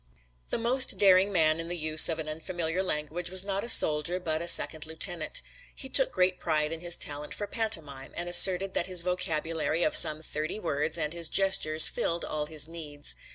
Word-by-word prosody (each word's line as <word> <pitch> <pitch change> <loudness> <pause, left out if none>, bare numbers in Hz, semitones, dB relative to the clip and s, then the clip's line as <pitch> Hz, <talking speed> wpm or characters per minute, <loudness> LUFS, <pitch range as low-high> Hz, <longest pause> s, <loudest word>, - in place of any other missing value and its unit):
The - - -3
most 250 +3 0
daring 195 0 +3
man 160 -3 +1
in 165 - -4
the 175 - -5
use 155 0 +4
of 160 - -3
an 160 -1 -7
unfamiliar 165 +2 -4
language 170 0 -4
was 185 0 +1
not 195 0 -4
a 235 - -3
soldier 155 -1 +4
but 160 -3 -4
a 170 - -7
second 160 -2 +3
lieutenant. 160 0 -2 0.3
He 265 - -8
took 265 0 +1
great 180 0 0
pride 155 -2 -2
in 165 - -7
his 175 0 +2
talent 145 0 -1
for 205 - -6
pantomime 160 - -3
and 175 - -5
asserted 185 +2 +5
that 170 - -2
his 180 -2 +1
vocabulary 165 -2 -3
of 155 - 0
some 155 +1 +4
thirty 155 +6 -6
words 155 -3 -3
and 155 -1 -4
his 170 -2 -2
gestures 190 -5 +2
filled 170 0 -3
all 150 -1 -5
his 155 -1 -1
needs. 155 -3 -4
165 Hz, 200 wpm, -26 LUFS, 155-185 Hz, 0.3 s, asserted